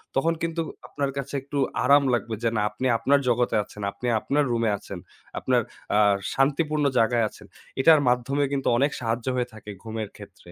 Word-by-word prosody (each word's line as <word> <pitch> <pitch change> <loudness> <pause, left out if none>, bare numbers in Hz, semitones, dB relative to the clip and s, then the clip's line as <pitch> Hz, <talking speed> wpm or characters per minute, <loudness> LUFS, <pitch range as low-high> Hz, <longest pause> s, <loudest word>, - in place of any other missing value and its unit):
তখন 165 +5 +2
কিন্তু 165 0 -1 0.3
আপনার 140 -1 -2
কাছে 140 0 -5
একটু 140 +2 -6 0.3
আরাম 140 +2 +6
লাগবে 115 -2 -1
যে 115 - +3
না 105 - +1
আপনি 105 +5 -5
আপনার 140 +5 +3
জগতে 120 0 +1
আছেন, 105 - -12
আপনি 125 +5 -6
আপনার 145 +6 +1
রুমে 115 -1 +1
আছেন, 100 -3 -9 0.4
আপনার - - +2 0.3
আ - - +5 0.3
শান্তিপূর্ণ 150 +2 +1
জায়গায় 115 0 +3
আছেন। - - -15 0.4
এটার 155 +1 +7
মাধ্যমে 125 +4 +1
কিন্তু 140 -1 -1
অনেক 140 +3 +2
সাহায্য 115 +1 -2
হয়ে 125 -1 0
থাকে 110 -1 -11
ঘুমের 110 -2 -5
ক্ষেত্রে। 85 - -14
125 Hz, 175 wpm, -25 LUFS, 115-140 Hz, 0.4 s, এটার